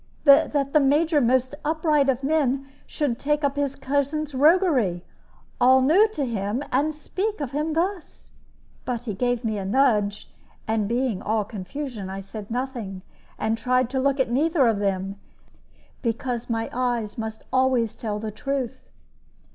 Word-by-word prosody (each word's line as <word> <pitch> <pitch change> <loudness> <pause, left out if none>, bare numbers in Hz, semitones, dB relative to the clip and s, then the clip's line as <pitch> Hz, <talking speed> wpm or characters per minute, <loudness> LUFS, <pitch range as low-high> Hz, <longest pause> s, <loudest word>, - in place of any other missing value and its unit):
That 280 -1 +4
the 305 - +6
Major, 295 +2 +3
most 255 +2 +2
upright 305 -2 +2
of 265 0 0
men, 275 -2 +1 0.2
should 275 -5 -2
take 295 +1 0
up 280 -1 +1
his 285 -1 -1
cousin's 285 +2 -1
roguery 270 - +3 0.6
all 260 +1 +6
new 360 +11 +5
to 290 -7 -1
him 220 +2 -2
and 285 +5 +2
speak 380 +7 -3
of 280 -4 -4
him 300 +3 -1
thus! 355 +2 -3 0.5
But 245 -2 -3
he 225 -4 -4
gave 245 +3 -1
me 215 -2 -1
a - - -4
nudge; 210 -2 +1 0.4
and 220 -2 0
being 240 -3 -1
all 215 0 0
confusion, 210 +1 -6
I 190 +1 -5
said 200 +1 -8
nothing, 235 -6 -4 0.3
and 220 +1 -1
tried 255 +1 +1
to 265 - 0
look 275 +1 +1
at 260 -3 +1
neither 295 +2 +3
of 220 -3 +1
them, 195 0 -2 0.8
because 240 0 -2
my 225 -1 -1
eyes 240 -4 -1
must 220 0 -5
always 260 -4 +2
tell 210 -2 -3
the 215 0 -4
truth. 260 +3 -4
255 Hz, 155 wpm, -24 LUFS, 220-285 Hz, 0.8 s, the